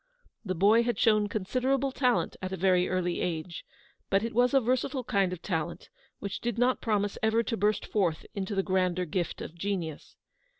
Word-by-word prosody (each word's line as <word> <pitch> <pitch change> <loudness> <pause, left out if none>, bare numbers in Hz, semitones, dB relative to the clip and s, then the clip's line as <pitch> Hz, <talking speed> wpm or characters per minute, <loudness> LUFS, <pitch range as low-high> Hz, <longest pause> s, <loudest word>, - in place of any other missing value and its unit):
The 185 -4 -2
boy 205 +6 +5
had 240 0 -1
shown 215 -2 +3
considerable 255 +7 0
talent 250 -2 +1
at 185 0 -4
a 190 - -3
very 180 0 +3
early 180 -1 -1
age, 170 -1 -3 0.5
but 195 +1 +2
it 230 - -3
was 245 +2 +3
a - - +7
versatile 255 +2 0
kind 195 -5 +1
of 180 -2 -7
talent 165 -6 -3 0.3
which 200 - -5
did 235 -2 -2
not 250 +2 +2
promise 205 -2 0
ever 220 +1 +2
to 230 - -2
burst 210 0 +1
forth 175 -7 0
into 200 +1 -3
the 195 - +1
grander 185 -1 +1
gift 175 +1 -3
of - - -8
genius. 170 -4 -4
200 Hz, 185 wpm, -29 LUFS, 180-230 Hz, 0.5 s, a